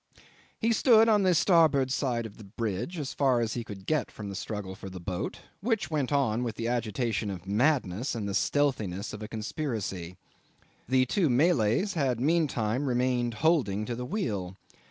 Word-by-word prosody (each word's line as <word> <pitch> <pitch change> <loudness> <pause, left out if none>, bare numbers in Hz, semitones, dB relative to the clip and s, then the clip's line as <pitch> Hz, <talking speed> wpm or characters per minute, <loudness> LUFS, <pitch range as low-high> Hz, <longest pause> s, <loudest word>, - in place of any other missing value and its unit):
'He 230 0 +2
stood 225 -1 +5
on 215 -2 +4
the 185 -2 +3
starboard 155 -7 +4
side 125 -4 0
of 105 -2 -9
the 110 - -11
bridge, 110 - -4
as 145 -4 -4
far 130 -4 +2
as 115 -2 -1
he 120 - -3
could 100 -3 -9
get 150 -3 0
from 105 -2 -8
the 100 - -6
struggle 100 -2 -5
for 95 0 -9
the 95 0 -8
boat, 90 +1 -4 0.2
which 225 -4 -1
went 145 -4 0
on 125 -5 +1
with 115 -3 -3
the 115 - -3
agitation 115 -2 -1
of 95 -2 -6
madness 120 - +1
and 105 -3 -3
the 100 - -3
stealthiness 110 -5 0
of 105 - -7
a 105 - -5
conspiracy. 105 - -4 0.7
The 130 0 +4
two 165 +5 +1
Malays 145 - +2
had 135 - 0
meantime 140 -4 +1
remained 125 -1 0
holding 115 - +2
to 120 - -3
the 125 - -5
wheel. 100 - -3
120 Hz, 180 wpm, -28 LUFS, 105-145 Hz, 0.7 s, stood